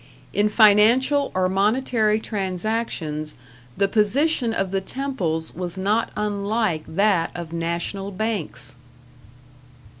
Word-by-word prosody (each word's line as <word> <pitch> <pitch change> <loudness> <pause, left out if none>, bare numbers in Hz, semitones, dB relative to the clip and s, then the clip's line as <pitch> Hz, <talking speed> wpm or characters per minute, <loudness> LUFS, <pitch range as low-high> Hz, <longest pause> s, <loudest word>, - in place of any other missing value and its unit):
In 210 +1 +2
financial 235 +7 +4
or 185 0 +2
monetary 215 +2 +1
transactions 190 -7 -3 0.4
the 200 - +3
position 235 +6 +2
of 195 -4 -1
the 195 0 0
temples 190 - -3
was 180 +1 -5
not 210 +4 +1
unlike 205 -4 -1
that 195 -4 +2
of 170 -2 -7
national 170 +4 -2
banks.... 195 - -4
205 Hz, 100 wpm, -23 LUFS, 180-225 Hz, 0.4 s, financial